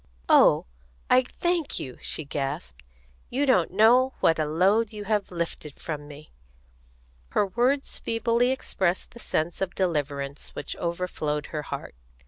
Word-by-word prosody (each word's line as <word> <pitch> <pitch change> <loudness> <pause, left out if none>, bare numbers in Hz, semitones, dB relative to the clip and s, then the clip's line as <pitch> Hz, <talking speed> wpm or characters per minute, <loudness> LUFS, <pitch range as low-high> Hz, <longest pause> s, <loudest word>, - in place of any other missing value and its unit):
"Oh, - - +6 0.5
I 255 - +7
thank 340 +5 -1
you!" 130 -2 -7
she 160 - -2
gasped. 135 - -4 0.5
"You 275 +4 +1
don't 220 -11 +3
know 240 +7 +5
what 165 -1 +3
a 155 - +2
load 195 +8 +3
you 210 -1 -6
have 205 0 0
lifted 170 -4 -5
from 150 -2 -5
me!" 150 +1 -12 1.0
Her - - +3
words 250 +7 0
feebly 230 +2 +1
expressed 190 -8 -1
the 235 - -13
sense 170 -5 -2
of 190 -1 -2
deliverance 145 -5 -2
which - - -5
overflowed 170 -4 -2
her 150 - -1
heart. - - -6
180 Hz, 140 wpm, -26 LUFS, 150-230 Hz, 1.0 s, I